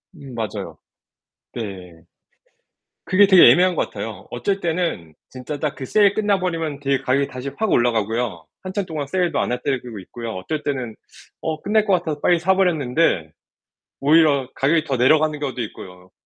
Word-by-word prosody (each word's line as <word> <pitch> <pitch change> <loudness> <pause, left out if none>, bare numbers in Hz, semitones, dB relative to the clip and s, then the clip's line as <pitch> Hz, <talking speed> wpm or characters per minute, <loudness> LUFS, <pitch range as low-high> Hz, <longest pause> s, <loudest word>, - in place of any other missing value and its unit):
음 140 -5 -11
맞아요. 110 -2 -5 0.8
네. 90 -7 -7 1.0
그게 200 +2 +5
되게 190 -3 +8
애매한 180 0 +3
것 - - -1
같아요. 105 +1 -7
어쩔 190 +11 -1
때는 165 - -2 0.2
진짜 130 +3 -6
딱 150 -1 -2
그 135 - -6
세일 200 +5 +4
끝나 205 -2 +1
버리면 165 -5 -3
되게 140 -1 0
가격이 135 +2 +1
다시 130 +1 -6
확 220 -1 0
올라가고요. 115 -6 0 0.2
한참 190 +1 -3
동안 155 -5 -5
세일도 175 -1 0
안 - - -1
할 125 - -1
때도 125 -6 -3
있고요. 115 +5 -8
어쩔 145 +12 -4
때는 125 -6 -3 0.5
어 155 -1 -3
끝날 215 +1 +2
것 200 - +2
같아서 160 -4 -1
빨리 175 -1 +3
사 190 +3 +2
버렸는데 155 - +1 0.7
오히려 145 -2 +4
가격이 155 +3 +2
더 140 -4 -1
내려가는 150 +4 +3
경우도 130 -4 -3
있고요. 90 -4 -10
145 Hz, 345 characters per minute, -21 LUFS, 120-170 Hz, 1.0 s, 되게